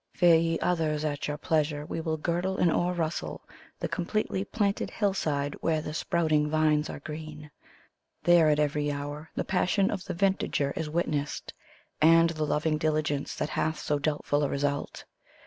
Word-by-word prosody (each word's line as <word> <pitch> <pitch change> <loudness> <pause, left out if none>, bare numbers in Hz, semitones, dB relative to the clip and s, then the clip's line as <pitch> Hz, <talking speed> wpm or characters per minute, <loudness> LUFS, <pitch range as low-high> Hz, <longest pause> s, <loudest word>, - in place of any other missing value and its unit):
Fare, 175 -2 +6
ye 165 0 +2
others, 155 -3 0
at 145 -1 -2
your 150 0 -3
pleasure; 150 -2 0
we 165 - -4
will 160 -1 -1
girdle 175 +4 -1
and 175 - +3
o'errustle 175 -2 -1 0.4
The - - -2
eompletely^planted 200 +2 -1
hillside, 150 -9 -1
where 160 -1 +1
the 150 0 -5
sprouting 155 -2 +1
vines 155 -1 +2
are - - -6
green. 150 0 -8 0.7
There 175 -3 +6
at 150 - +3
every 150 0 +1
hour 145 +2 -5
the - - -2
passion 190 +1 +1
of 195 -3 -4
the 185 -3 -4
vintagier 185 -7 +1
is 155 - -3
witnessed. 150 -3 -2 0.5
And 165 +1 +6
the 155 -2 -2
loving 155 +1 0
diligence, 150 -2 -1
that - - -2
hath 160 0 -1
so 150 -1 -1
doubtful 145 0 0
a 140 - +1
result. 145 0 -2
155 Hz, 160 wpm, -28 LUFS, 150-170 Hz, 0.7 s, Fare